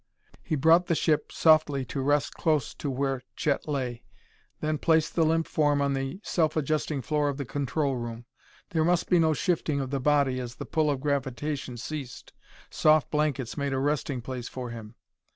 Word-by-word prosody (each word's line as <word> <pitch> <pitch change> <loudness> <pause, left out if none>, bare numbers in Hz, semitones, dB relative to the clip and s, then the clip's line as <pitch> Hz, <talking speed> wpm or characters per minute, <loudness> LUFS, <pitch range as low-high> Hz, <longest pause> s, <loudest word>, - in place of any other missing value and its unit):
He 160 - -2
brought 165 +5 +4
the 170 - +2
ship 155 -1 +1
softly 155 -4 +3
to 135 +3 -4
rest 145 +1 +1
close 155 -5 0
to 145 - -4
where 135 0 -1
Chet 145 0 -1
lay, 130 -5 -3 0.6
then 155 -1 -1
placed 160 -2 +2
the 165 - +3
limp 165 +1 +2
form 145 -2 +1
on 140 0 +1
the 135 +5 -3
self 160 -2 0
adjusting 150 -2 -1
floor 150 -1 +1
of 140 - -3
the 140 - -4
control 140 +1 -1
room. 120 -1 -6 0.5
There 160 -3 +2
must 175 +2 +1
be 180 - +6
no 160 -1 +3
shifting 155 -3 0
of 135 -1 -3
the 140 - 0
body 140 -2 +2
as 125 -1 -6
the - - -7
pull 155 -1 +1
of 140 -2 -1
gravitation 140 -1 -2
ceased. 130 +1 -7 0.4
Soft 155 -1 +3
blankets 150 -5 -1
made 140 -1 -1
a - - 0
resting 140 -2 -1
place 125 -1 -5
for 125 -2 -6
him. 110 -2 -9
145 Hz, 190 wpm, -27 LUFS, 130-155 Hz, 0.6 s, be